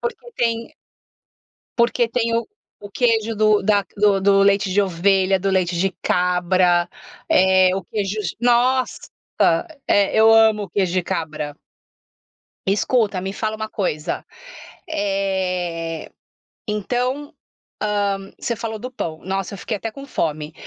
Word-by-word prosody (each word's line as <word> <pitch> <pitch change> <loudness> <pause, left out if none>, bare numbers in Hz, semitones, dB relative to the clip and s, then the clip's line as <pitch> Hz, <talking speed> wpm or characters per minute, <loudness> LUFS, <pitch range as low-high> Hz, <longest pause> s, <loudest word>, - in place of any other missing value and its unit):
Porque 480 0 -5
tem 230 -1 -1 1.0
Porque 235 0 +2
tem 230 -1 0
o 230 - 0 0.3
o 205 0 -11
queijo 225 -1 +1
do 215 0 +3
da 205 0 +3
do 200 -1 +3
do 195 0 +4
leite 200 -1 +2
de 195 - +2
ovelha, 190 +1 +2
do 195 +1 -1
leite 185 -2 +1
de 190 +3 +1
cabra, 180 0 +2 0.4
eh, 185 0 +4
o 195 - -3
queijo 205 +1 -3 0.2
nossa, 245 +2 +2 0.9
é 200 -1 +3
eu 220 0 +7
amo 220 -2 +4
queijo 185 -3 0
de 185 - +2
cabra. 155 -5 -4 1.1
Escuta, 205 0 +1
me 190 +1 -3
fala 215 +1 -2
uma 220 0 -5
coisa. 160 -8 -3 0.6
Eh, 185 - -2 0.6
então, 250 +7 -2 0.5
hã, 200 -2 -1
você 235 - -2
falou 220 -1 -5
do 250 +3 -7
pão, 160 -10 -5
nossa 195 +1 -3
eu - - -6
fiquei 215 +2 -4
até 225 +2 -5
com 275 +4 -10
fome. 155 - -3
200 Hz, 135 wpm, -21 LUFS, 185-225 Hz, 1.1 s, eu